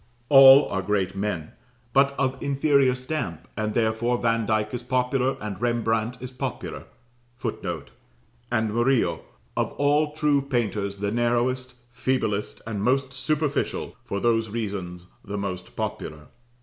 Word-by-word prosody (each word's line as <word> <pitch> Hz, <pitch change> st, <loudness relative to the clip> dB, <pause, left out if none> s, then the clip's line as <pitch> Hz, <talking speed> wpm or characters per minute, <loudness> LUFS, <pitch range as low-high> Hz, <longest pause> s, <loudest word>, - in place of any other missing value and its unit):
All 135 Hz, 0 st, +9 dB
are 95 Hz, -, -1 dB
great 95 Hz, -1 st, 0 dB
men, 95 Hz, -6 st, -3 dB, 0.4 s
but 140 Hz, 0 st, +4 dB
of 130 Hz, -1 st, -1 dB
inferior 140 Hz, -2 st, +3 dB
stamp, 125 Hz, -, -4 dB
and 110 Hz, 0 st, -2 dB
therefore 115 Hz, +2 st, +1 dB
Vandyke 110 Hz, -2 st, 0 dB
is 125 Hz, -, -3 dB
popular, 125 Hz, +1 st, 0 dB
and 105 Hz, -3 st, -6 dB
Rembrandt 115 Hz, 0 st, 0 dB
is 130 Hz, 0 st, -7 dB
popular, 130 Hz, -, -5 dB, 0.5 s
[Footnote: 90 Hz, -, -4 dB, 0.6 s
And 110 Hz, -3 st, +1 dB
Murillo, 120 Hz, +2 st, +2 dB, 0.3 s
of -, -, -1 dB
all 150 Hz, +1 st, +2 dB
true 150 Hz, -2 st, +2 dB
painters 110 Hz, -7 st, -1 dB
the 100 Hz, +1 st, -2 dB
narrowest, 120 Hz, +2 st, 0 dB, 0.2 s
feeblest, 115 Hz, -4 st, -1 dB
and 110 Hz, -3 st, -3 dB
most 135 Hz, +4 st, +1 dB
superficial, 145 Hz, +2 st, -1 dB
for 100 Hz, -, -3 dB
those 115 Hz, 0 st, +1 dB
reasons 100 Hz, -5 st, -4 dB, 0.2 s
the 100 Hz, +1 st, -5 dB
most 95 Hz, -2 st, -5 dB
popular. 75 Hz, 0 st, -5 dB
120 Hz, 130 wpm, -25 LUFS, 105-130 Hz, 0.6 s, All